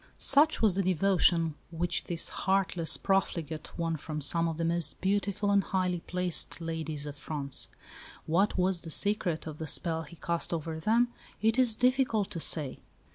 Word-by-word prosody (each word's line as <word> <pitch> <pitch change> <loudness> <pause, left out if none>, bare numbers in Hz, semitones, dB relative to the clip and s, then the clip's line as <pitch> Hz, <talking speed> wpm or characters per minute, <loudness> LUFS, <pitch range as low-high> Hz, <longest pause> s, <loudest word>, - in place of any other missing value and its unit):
Such 290 -1 +4
was 210 -4 +5
the 195 - 0
devotion 175 -3 +2 0.2
which 170 +1 -2
this 170 -2 0
heartless 190 -3 +1
profligate 165 -5 -2
won 165 -1 -1
from 155 +1 -6
some 165 +3 +3
of 165 -1 -3
the 165 - -1
most 165 -2 0
beautiful 200 +1 0
and 200 -1 +3
highly 180 -2 -1
placed 180 0 -1
ladies 160 -3 -4
of 145 -1 -7
France. 145 -2 -2 0.6
What 190 +7 +1
was 185 -1 +1
the 165 - -8
secret 180 -2 +1
of 155 -1 -7
the 160 - -4
spell 165 +1 -1
he 160 +1 -11
cast 170 +1 -2
over 160 0 -5
them 230 +8 +2 0.3
it 225 +3 +2
is 245 -4 +5
difficult 250 -4 +1
to 170 - -4
say. 150 -4 +1
170 Hz, 170 wpm, -29 LUFS, 160-195 Hz, 0.6 s, was